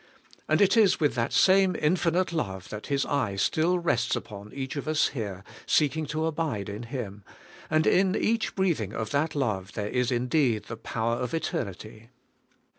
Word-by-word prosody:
And - - +3
it 200 +1 +5
is 215 -5 +4
with 150 -6 +2
that 115 -1 -1
same 190 -1 +4
infinite 170 +2 +1
love 95 - -3
that 105 0 -7
His 140 -1 0
eye 130 -9 -1
still 160 - +2
rests 125 -9 +1
upon 105 0 -8
each 135 0 -5
of 145 - -4
us 155 0 +2
here 100 -7 -5 0.2
seeking 155 +1 +2
to 155 +2 -1
abide 150 -11 -2
in 105 +2 -6
Him, 115 -5 -6 0.5
and 155 0 +2
in 190 +1 +3
each 225 +1 0
breathing 165 - 0
of 110 -1 -4
that 155 +3 0
love 105 -9 -2
there 105 0 -3
is 125 0 0
indeed 125 -2 +1
the 115 - -7
power 115 +1 -2
of 125 +6 -3
eternity. 110 - -5
135 Hz, 175 wpm, -27 LUFS, 110-160 Hz, 0.5 s, it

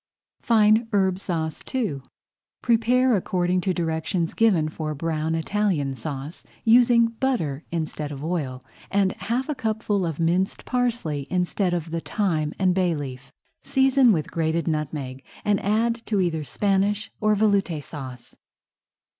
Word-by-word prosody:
FINE 220 0 +4
HERB 190 -2 +2
SAUCE 160 -5 -3
II 205 - -1 0.6
Prepare 245 +2 +3
according 180 -1 0
to 190 - 0
directions 165 0 -1
given 195 -9 +3
for 155 -1 -4
Brown 160 +1 -1
Italian 165 -5 0
Sauce, 145 +2 -6 0.2
using 235 0 +6
butter 225 - -1
instead 155 -3 -3
of 140 0 -7
oil 145 -7 -3 0.3
and 195 -1 +2
half 235 +8 -2
a 300 - -1
cupful 220 -5 -1
of 165 -3 -3
minced 175 +4 0
parsley 230 - -1
instead 180 0 0
of 165 -1 -4
the 165 - -1
thyme 160 -5 -1
and 185 -2 +2
bay 180 -2 +1
leaf. 135 -2 -7 0.3
Season 265 -2 +4
with 160 -7 -1
grated 165 0 0
nutmeg 145 -4 -3 0.2
and 205 -2 +2
add 230 +3 +1
to 210 -3 +1
either 165 -4 0
Spanish 200 +7 0
or 215 0 +3
Veloute 195 -7 +1
Sauce. 130 -5 -9
180 Hz, 140 wpm, -24 LUFS, 155-215 Hz, 0.6 s, using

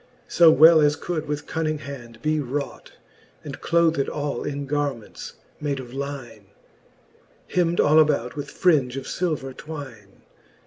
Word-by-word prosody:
So 170 -2 +6
well 160 +2 +7
as 145 0 +3
could 160 -1 -4
with 150 0 -3
cunning 155 -1 -2
hand 120 -6 -10
be 155 0 +1
wrought, 140 +1 -5 0.5
And - - -8
clothed 165 -4 +2
all 145 -4 -3
in 145 -1 -4
garments 140 -5 -4 0.3
made 145 -2 -2
of 125 -1 -9
line, 135 -7 -7 1.1
Hemd 175 -1 +1
all 155 +2 +5
about 140 -6 +2
with 145 - -6
fringe 140 -8 +2
of 135 - -4
filver 150 -7 -3
twine. 130 -11 -10
145 Hz, 140 wpm, -23 LUFS, 130-155 Hz, 1.1 s, well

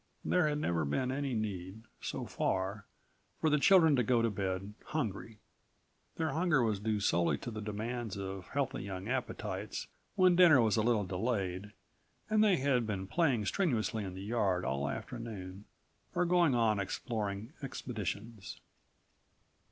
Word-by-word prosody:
There 180 -4 +3
had 150 -1 0
never 85 - 0
been 125 - 0
any 135 -2 -2
need, 100 -1 -4 0.2
so - - -4
far, 95 +2 -2 0.5
for 155 - +2
the 150 - +4
children 160 -2 +6
to 125 - +3
go 115 0 +2
to 115 - +2
bed 95 0 -3
hungry. 115 -6 -3 0.8
Their 160 -2 -1
hunger 160 -3 +2
was 110 -3 0
due 105 0 0
solely 85 -3 +2
to 120 - -6
the 110 -1 -5
demands 110 +1 -4
of 95 -2 -5
healthy 140 -2 -2
young 95 0 -6
appetites 105 -6 -3 0.3
when 185 -2 +5
dinner 170 -6 +7
was 110 -3 +3
a 110 - +2
little 110 -2 +2
delayed 95 0 -2 0.6
and 215 0 +5
they 205 -4 +4
had 130 -4 +1
been 95 -3 -2
playing 130 - +1
strenuously 115 - 0
in 95 -2 -6
the 95 - -7
yard 100 -5 0
all 70 +2 -1
afternoon 110 -4 -6 0.5
or 180 0 +2
going 170 -6 +4
on 110 -3 +3
exploring 105 +3 -3
expeditions. 110 - -5
110 Hz, 150 wpm, -33 LUFS, 100-135 Hz, 0.8 s, dinner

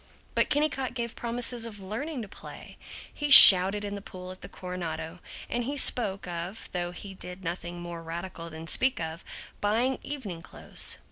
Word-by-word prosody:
But - - 0
Kennicott 270 -4 -2
gave 235 -2 -5
promise 240 +1 0
of 230 -3 -4
learning 235 +8 -6
to - - -10
play. - - -13 0.4
He 295 -1 -4
shouted 195 -4 +10
in 205 - -6
the 200 - -7
pool 185 -2 -10
at 185 - -12
the 180 - -9
Coronado, 180 -2 -7 0.3
and 240 0 -4
he 285 +3 -5
spoke 200 -8 0
of 175 +4 -7
(though 175 -1 -3
he 195 +2 -10
did 180 0 -11
nothing 175 0 -6
more 170 -1 -8
radical 170 +1 -8
than 160 0 -10
speak 260 +10 +2
of) 160 +1 -7 0.4
buying 235 +6 -1
evening 215 -13 -8
clothes. - - -4
195 Hz, 175 wpm, -26 LUFS, 175-240 Hz, 0.4 s, shouted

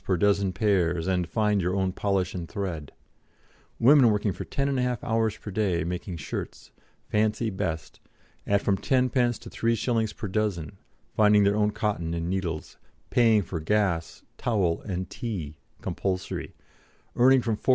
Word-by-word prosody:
per 95 - +1
dozen 100 +1 +2
pairs 90 -5 +1
and 90 -2 0
"find 105 -3 +1
your 90 +2 0
own 95 -1 +1
polish 95 -1 -1
and 85 -3 -5
thread"; 85 -8 -4 0.9
women 130 0 +7
working 105 -1 +1
for - - -6
10 140 0 -2
1/2 125 -1 0
hours 110 -2 0
per 105 - -8
day, 95 -5 0
making 90 +1 -4
shirts 75 - -6 0.4
"fancy 110 +1 +1
best" 85 -4 -4 0.5
at 100 0 +2
from 100 - +2
10d. 125 +1 +1
to - - -13
3s. 115 -1 0
per 105 - -4
dozen, 95 -6 -1 0.4
finding 105 -1 +5
their 100 +1 +3
own 105 0 +2
cotton 100 -6 -2
and 85 0 -2
needles, 90 -4 -3 0.3
paying 115 -4 +4
for 85 -1 -4
gas, 85 -1 0 0.2
towel, 100 -9 +1
and 95 -1 -3
tea 90 -11 -5 0.3
(compulsory), 95 -1 -3 0.6
earning 130 +1 +5
from 115 -2 0
4s. 105 - -6
100 Hz, 150 wpm, -27 LUFS, 90-110 Hz, 0.9 s, women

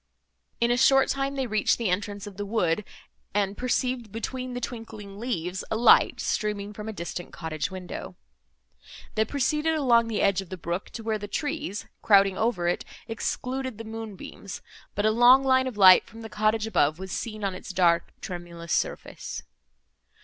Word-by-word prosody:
In 235 0 +3
a 240 - +2
short 270 +1 +5
time 275 0 -1
they 265 -1 -1
reached 215 -3 +2
the 225 -6 0
entrance 205 +1 -2
of 205 -2 -9
the 205 +1 -4
wood, 200 -3 +1 0.5
and 200 -1 +1
perceived, 250 -2 -1
between 255 +3 -4
the - - -2
twinkling 220 -5 -7
leaves, 190 -6 -3
a - - 0
light, 235 +2 +5
streaming 210 -1 -2
from 210 +1 -6
a - - -2
distant 175 -2 -6
cottage 160 -2 -3
window. 185 -2 -7 1.0
They 220 - +2
proceeded 300 +5 0
along 240 -6 +4
the 220 -2 -1
edge 195 -1 +3
of 190 - -12
the 185 - -6
brook 170 +3 -4
to 230 - -6
where 220 -1 -1
the 205 - -6
trees, 295 -4 -3 0.2
crowding 195 -2 +5
over 215 -5 0
it, 175 - 0 0.2
excluded 255 +2 -3
the 225 - -7
moonbeams, 220 -3 -8 0.3
but 205 - 0
a 215 - +5
long 245 +4 +7
line 260 -1 +3
of 245 -5 -5
light, 190 -2 +8
from 225 +1 -12
the 220 - -8
cottage 215 +1 +1
above, 160 -8 +2
was 190 0 -7
seen 215 0 -4
on 195 -1 0
its 185 - -9
dark 175 -2 +3
tremulous 170 -2 -6
surface. - - -3
215 Hz, 180 wpm, -26 LUFS, 190-240 Hz, 1.0 s, light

